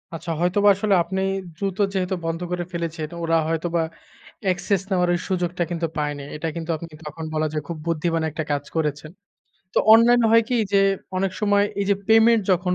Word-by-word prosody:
আচ্ছা। 165 +1 -5
হয়তোবা 200 +4 +3
আসলে 200 +1 0
আপনি 190 +2 -3 0.4
দ্রুত 195 -1 -3 0.2
যেহেতু 190 -1 -1
বন্ধ 165 +1 -2
করে 180 0 -1
ফেলেছেন 165 -2 -3
তো 170 - -8
ওরা 165 0 +2
হয়তোবা 165 +1 0 0.6
অ্যাক্সেস 185 +1 +1
নেওয়ার 180 -2 +2
ওই 175 - 0
সুযোগটা 180 -1 -1
কিন্তু 170 -1 -2
পায়নি। 145 -1 -2
এটা 155 +2 -3
কিন্তু 165 0 -6
আপনি 165 +2 -8 0.2
তখন 155 +2 -7
বলা 155 0 0
যায় 150 -1 -3
খুব 170 - -5
বুদ্ধিমান 165 0 0
একটা 155 - -3
কাজ 145 0 -1
করেছেন। 150 -1 -2 0.6
তো - - +4
অনলাইন 240 +2 +6
হয় 230 0 +6
কি 250 - +1 0.2
যে 200 - +5 0.4
অনেক 190 0 0
সময় 205 -1 +3 0.2
এই 200 - +1
যে - - +5
পেমেন্ট 225 0 +5
যখন 180 0 +1
175 Hz, 190 wpm, -23 LUFS, 165-195 Hz, 0.6 s, অনলাইন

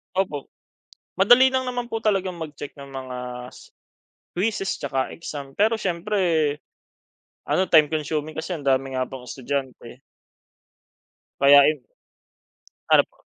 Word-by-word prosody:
Opo. 165 -8 -2 0.6
Madali 245 +7 +6
lang 260 - +2
naman 245 -1 -3
po 225 -1 -4
talagang 195 -4 0
mag-check 150 -3 -8
ng 140 -1 -11
mga 130 -1 -6 0.4
s - - -15 0.6
quizes 195 +1 -1
tsaka 135 -2 -2
exam. 140 -4 -8
Pero 220 +2 +2
siyempre, 195 +2 -2 1.3
ano, 190 - +2
time 155 -3 +7
consuming 155 0 -3
kasi 160 +3 -5
ang 145 -5 -4
dami 135 0 +1
nga 130 0 -1
pong 130 -1 -9
estudyante. 130 -1 -5 1.4
Kaya 140 +1 +8
ayun. 150 -3 +1 1.1
Ano - - +7
po? - - -31
155 Hz, 125 wpm, -23 LUFS, 135-195 Hz, 1.4 s, Kaya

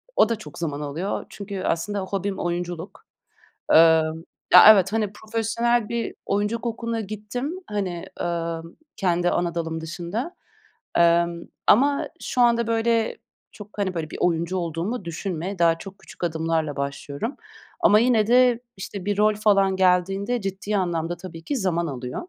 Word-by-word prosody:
o 220 - +5
da 230 - +1
çok 215 - -11
zaman 150 -3 -3
alıyor 155 +7 -3
çünkü 200 -2 -6
aslında 200 +5 -1
hobim 195 +1 -3
oyunculuk. 175 +1 -4 0.7
Eee, - - +8 0.8
ya, 180 - +11
evet, 195 0 +2
hani, 215 -2 0
profesyonel 225 +1 0
bir 235 -1 -3
oyunculuk 210 +4 -1
okuluna 230 0 -2
gittim, 215 - -5
hani, 190 -5 -3
emm, 170 -1 -2 0.3
kendi 175 -1 +1
ana 175 -1 -1
dalım 165 -1 -3
dışında, 175 - -5 0.6
emm, 170 0 +3 0.3
ama 280 +5 +4
şu 250 - -2
anda, 235 -1 +3
böyle, 230 0 +1 0.3
çok, 210 -2 -11
hani, 190 -2 -1
böyle, 160 -2 -4
bir - - -7
oyuncu 170 +1 0
olduğumu 170 +6 -3
düşünme. 180 +2 -4
Daha 165 -1 +3
çok 195 +2 -10
küçük - - -9
adımlarla 160 -2 -1
başlıyorum 140 - -4 0.4
ama 210 - +6
yine 230 -3 +3
de, 245 0 +4 0.2
işte, 190 0 -7
bir 205 0 -1
rol 215 0 +4
falan 195 -2 +3
geldiğinde 195 +5 +2
ciddi 195 +2 -3
anlamda 175 -2 -1
tabii 165 -3 -9
ki 285 - -2
zaman 170 -5 0
alıyor. 125 -3 -6
195 Hz, 150 wpm, -24 LUFS, 170-220 Hz, 0.8 s, ya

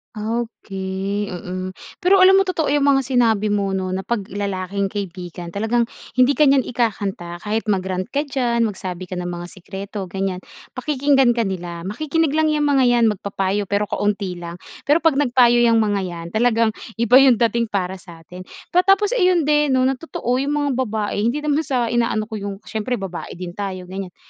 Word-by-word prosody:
Okey, 205 -3 -3
mm. 185 +1 -6 0.2
Pero 375 +1 +5
alam 385 +1 +7
mo 390 - +1
totoo 320 -6 0
yung 285 -1 +2
mga 270 -1 +4
sinabi 225 -5 +2
mo, 200 -2 0
'no, 185 -1 -2
na 185 - -2
'pag 210 +1 -2
lalaking 200 -1 -2
kaibigan, 175 -3 -6
talagang 225 +4 +1 0.3
hindi 255 +2 +5
ka 300 +1 +4
niyan 270 -2 +4
ikakanta 200 -7 -2
kahit 220 +2 -2
mag-rant 185 -2 -1
ka 285 +2 -1
diyan 245 -5 0
magsabi 185 -4 -4
ka 180 - -3
ng 175 - -4
mga 175 0 -5
sikreto 195 +1 -7
ganyan, 190 0 -3 0.3
pakikinggan 270 -2 +2
ka 230 - +1
nila. 175 -3 -5
Makikinig 300 - -1
lang 315 +1 +2
yang 300 -1 +1
mga 280 -2 +3
yan 240 -1 +4
magpapayo 200 0 -2
pero 205 0 -1
kaunti 200 -3 -1
lang. 170 0 -7 0.3
Pero 310 +3 +3
'pag 315 -4 +3
nagpayo 245 -3 +4
yang 230 -2 +4
mga 205 -2 0
yan, 170 -1 -7
talagang 230 0 +2 0.2
iba 235 +2 +5
yung 265 -3 +6
dating 235 0 +1
para 190 -2 -3
sa 170 -3 -14
atin. 180 +2 -11 0.2
Pa 360 +2 +3
tapos 395 +2 +4
ayun 365 -8 +3
din, 295 -2 +2
'no, 255 - +3
na 260 0 +1
totoo 255 -6 -2
yung 285 +2 -1
mga 290 -1 0
babae 215 -5 -1
hindi 295 +5 -1
naman 295 0 +1
sa 255 -7 -1
inaano 230 -2 +1
ko 215 -1 -6
yung 200 0 -5
siyempre 225 +3 -3
babae 195 -5 -6
din 175 0 -6
tayo, 185 -1 -5
ganyan. 185 0 -7
220 Hz, 190 wpm, -21 LUFS, 190-265 Hz, 0.3 s, alam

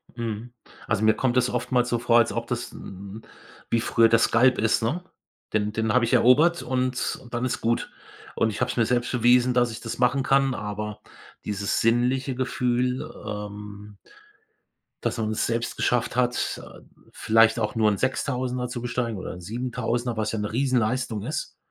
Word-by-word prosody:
Mhm. 115 0 -5 0.3
Also, 105 - 0
mir 110 0 +5
kommt 130 -1 0
das 125 0 +3
oftmals 125 0 0
so 120 - +1
vor, 120 0 +4
als 115 - +2
ob 115 0 -3
das 120 -1 -3
'n 100 +3 -10 0.5
wie 115 - +2
früher 115 0 +4
das 115 0 +4
Skalp 125 +2 +4
ist, 110 +1 +2
ne? 155 +11 -1 0.5
Den 105 -1 +1
den 110 0 0
habe 125 -1 +4
ich 115 - -2
erobert 145 +8 +5
und 125 0 -1
und 120 - -16
dann 120 +1 -1
ist 125 - -2
gut. 115 +1 0 0.4
Und 110 - +2
ich 105 - -6
hab's - - -1
mir 115 - +3
selbst 120 +1 0
bewiesen, 125 +1 +4
dass 120 -1 +2
ich 110 - -7
das 115 - -5
machen 125 +2 +3
kann, 135 -1 +3
aber 105 0 -5 0.4
dieses 100 -1 -1
sinnliche 125 +3 +1
Gefühl, 125 0 0 0.2
ähm 105 0 -7 1.1
dass - - -1
man 110 -1 -1
es 110 - 0
selbst 115 0 -2
geschafft 120 -1 0
hat, 125 -1 0
äh, - - -13 0.3
vielleicht 115 +1 +3
auch 105 -1 -2
nur 110 -1 +4
'n 100 - -1
6.000er 125 -1 -1
zu 120 -1 -5
besteigen 120 -2 -2
oder 95 - -6
'n 90 - -10
7.000er, 120 +3 -2
was 110 -1 -1
ja 110 - -3
'ne 105 0 -3
riesen 130 +2 +1
Leistung 115 -2 -1
ist, 150 +6 -4
120 Hz, 185 wpm, -25 LUFS, 110-125 Hz, 1.1 s, mir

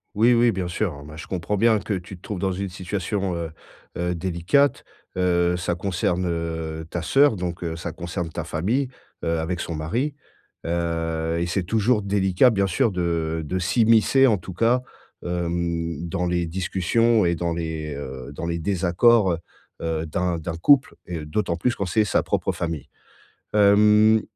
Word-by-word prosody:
Oui, 115 +3 +5
oui, 120 0 +4
bien 90 -2 -3
sûr. 85 -2 -2
Ah - - -11
ben, 75 +1 -11
je - - -7
comprends 95 +3 -2
bien 110 0 +4
que 100 +1 -2
tu 90 +1 -7
te - - -24
trouves 105 - -5
dans 95 0 0
une 95 +1 -3
situation, 95 0 -3
heu, 85 -1 -3 0.5
heu, 90 0 -1
délicate. 95 - +1 0.3
Heu, 90 -1 +2
ça 85 0 -1
concerne, 90 -1 -1
heu, 80 -1 -3
ta 85 - -3
sœur 135 - +4
donc, 90 -1 -4
heu, 80 -1 -3
ça 85 0 -5
concerne 85 -1 -4
ta - - -4
famille, 120 - -1 0.3
heu, 85 0 0
avec 85 +2 -2
son 85 - -4
mari, 115 - -1 0.5
heu, 85 -1 -1
et 85 - -1
c'est 90 +1 -1
toujours 110 +2 +1
délicat, 100 +4 +3
bien 100 -2 +1
sûr, 115 +4 +1
de 85 -3 -1
de 90 +5 -2
s'immiscer, 115 +7 +4
en 110 -5 +3
tout 90 +1 -9
cas, 115 +6 +2 0.4
hem, 85 -1 -2
dans 90 +2 -1
les 85 -1 0
discussions 95 +5 +1
et 85 - +2
dans 85 0 -1
les, 80 -3 -4
heu, 65 -1 -7
dans 85 - -5
les 85 0 -2
désaccords, 95 +4 +3
heu, 85 - -2 0.4
heu, 80 -1 -2
d'un 85 +2 -1
d'un 80 +1 -4
couple 145 - +4
et 80 -4 -5
d'autant 85 +2 -1
plus 120 +7 +1
quand 100 - -3
c'est 110 +5 +2
sa 100 - +2
propre - - -1
famille. 80 -5 -4 0.7
Hem, 105 +1 +5
90 Hz, 180 wpm, -24 LUFS, 85-105 Hz, 0.7 s, Oui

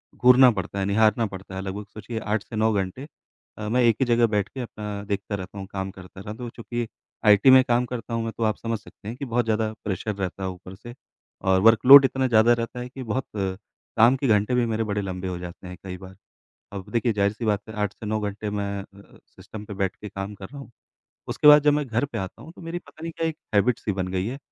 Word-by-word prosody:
घूरना 125 +1 +7
पडता 100 -2 -4
है, 95 - 0
निहारना 110 +3 +3
पड़ता 95 -2 -8
है। 95 - -4
लग-भग 100 +2 -5
सोचिए 110 +1 -6
8 105 -1 -2
से 115 - -10
9 110 +1 +2
घंटे। 100 +8 -3 0.5
अ, 105 - -5
मैं 125 +3 +2
एक 115 -2 +4
ही - - +4
जगह 120 0 +4
बैठ 105 -1 -1
के 135 - -9
अपना 105 -3 -6
देखता 100 0 -3
रहता 95 +1 -8
हूँ, 95 - -7
काम 95 0 -4
करता 95 0 -12
रहता 105 +5 -8
हूँ 120 - -6
चूँकि 120 0 -4 0.4
आईटी 105 +4 +6
में 130 0 +8
काम 120 0 +1
करता 120 -1 -6
हूँ 115 0 -1
मैं, 115 - -3
तो 115 - -1
आप 110 -1 +1
समझ 115 -1 -3
सकते 100 - -15
हैं 115 +3 -5
कि 140 - -5
बहुत 120 -1 0
ज़्यादा 110 -1 0
प्रेशर 105 +1 -3
रहता 95 0 -4
है 95 - -1
ऊपर 95 +1 -10
से 120 +5 -11 0.5
और 95 -1 +3
वर्क़ 115 +3 +5
लोड 140 0 +11
इतना 130 0 0
ज़्यादा 115 0 +5
रहता 115 +1 -3
है 125 0 -6
कि 130 +1 -8
बहुत 125 +3 -2 0.7
काम 120 +4 +6
के 135 - -1
घंटे 105 +2 +2
भी 125 -1 +2
मेरे 110 -2 -1
लंबे 95 -1 -5
हो 90 -1 -3
जाते 90 +1 -9
हैं, 90 0 -9
कई 95 -1 -6
बार। 95 +1 -12 0.6
अब 95 -2 -7
देखिए 120 -1 +1
जाहिर-सी 100 +3 0
बात 105 -2 +1
है - - -7
8 100 -1 -2
से - - -11
9 110 +1 0
घंटे 105 +1 -4
मैं 100 -1 -3
अ, 100 0 -17
सिस्टम 105 -1 -11
पे 105 - -7
बैठ 95 -1 -1
के 105 - -9
काम 100 +1 -6
कर 95 - -9
रहा 140 - -10
हूँ। 135 - -12 0.6
उसके - - +2
बाद 150 0 +9
जब 150 -1 +5
मैं 150 0 0
घर 120 +3 0
पे 130 -5 -7
आता 95 -3 -6
हूँ, 160 - -11
तो - - -14
मेरी 170 +1 -5
पता 150 -1 -18
नहीं 165 - -4
क्या 165 - -1
एक 160 -1 -4 0.2
हैबिट 115 +4 +3
सी 105 - -2
बन 95 -1 -2
गई 95 0 -1
है 130 +4 -4
110 Hz, 255 wpm, -24 LUFS, 100-120 Hz, 0.7 s, लोड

